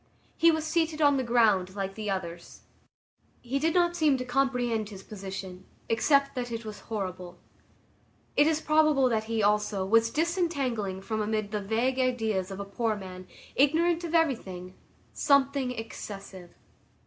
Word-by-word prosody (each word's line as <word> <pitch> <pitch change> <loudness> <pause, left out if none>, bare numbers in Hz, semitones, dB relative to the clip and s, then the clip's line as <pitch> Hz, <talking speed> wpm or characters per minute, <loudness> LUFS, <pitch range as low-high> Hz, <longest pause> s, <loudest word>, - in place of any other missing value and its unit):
He 335 - +5
was 315 -1 +1
seated 320 -1 0
on 285 -2 +4
the 260 - 0
ground 215 -6 +2
like 195 -1 -3
the 215 0 -5
others. 175 -3 -5 0.8
He 260 +3 -2
did 320 +3 +1
not 345 -1 +3
seem 305 -5 +3
to 250 - -4
comprehend 245 -4 0
his 195 -2 -10
position, 190 -2 -7 0.3
except 275 +5 +3
that 245 -2 -4
it 230 0 -5
was 215 -1 -7
horrible. 185 -4 -5 1.0
It 295 - +5
is 315 -1 +1
probable 305 -4 +3
that 220 -2 0
he, 225 -1 -1
also, 210 -1 +1
was 230 +3 +4
disentangling 275 - -1
from 220 +1 -2
amid 215 -1 -2
the 210 -1 -2
vague 235 +6 0
ideas 220 -7 0
of 195 0 -7
a 200 - -4
poor 220 +2 -1
man, 185 -2 -9 0.3
ignorant 325 +5 +3
of 340 0 -2
everything, 190 - 0 0.4
something 280 -2 +2
excessive. 200 -6 -8
230 Hz, 155 wpm, -28 LUFS, 200-280 Hz, 1.0 s, He